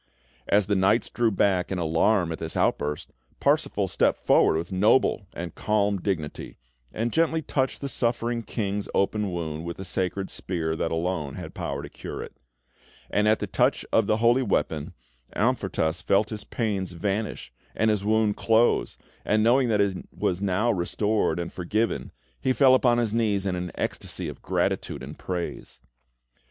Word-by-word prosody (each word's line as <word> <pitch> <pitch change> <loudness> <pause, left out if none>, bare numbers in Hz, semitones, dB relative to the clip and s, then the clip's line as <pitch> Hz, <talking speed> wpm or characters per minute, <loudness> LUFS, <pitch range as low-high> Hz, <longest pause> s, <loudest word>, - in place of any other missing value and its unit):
As 100 -1 +3
the 105 - 0
knights 95 +5 +2
drew 120 -1 +2
back 95 -3 +1
in 95 - -1
alarm 85 +2 +2
at 80 - -5
this 80 0 -3
outburst, 75 0 0 0.3
Parsifal - - +1
stepped - - +1
forward - - +5
with 85 +3 -4
noble 100 +1 +3
and 85 -1 -5
calm 105 -1 +1
dignity, 85 -7 -3 0.3
and 115 +1 -2
gently 160 0 +2
touched 130 -2 -1
the 140 - -2
suffering 120 -2 0
King's 105 -3 -3
open 105 0 +1
wound 80 -2 -4
with 85 0 -5
the 95 - -6
sacred 95 +1 -2
spear 80 -3 -3
that 80 - -1
alone 80 -3 -2
had - - -8
power - - -4
to - - -6
cure - - -7
it; - - -11 0.8
and 105 +1 +2
at 110 +1 +4
the - - -3
touch - - +1
of - - +4
the 110 - +2
holy 120 +3 +4
weapon, 80 - -1 0.4
Amfortas 80 +2 0
felt 105 +2 +2
his 105 -1 -6
pains 100 -6 -2
vanish, 95 - -3 0.2
and 110 0 +3
his 105 -2 -1
wound 110 0 +2
close, 115 +1 +2 0.3
and, 110 +1 +2
knowing 125 +2 +4
that 105 -2 +3
he 95 -3 0
was 90 +1 -1
now 100 +4 +1
restored 105 +4 0
and 85 0 -4
forgiven, 105 +6 -1 0.3
he 130 - +2
fell 130 -1 +6
upon 125 -2 +4
his 115 -3 0
knees 105 -4 +1
in 95 -2 0
an 90 0 -3
ecstasy - - -3
of - - -8
gratitude - - -1
and - - -9
praise. 90 -2 -5
100 Hz, 170 wpm, -26 LUFS, 90-110 Hz, 0.8 s, fell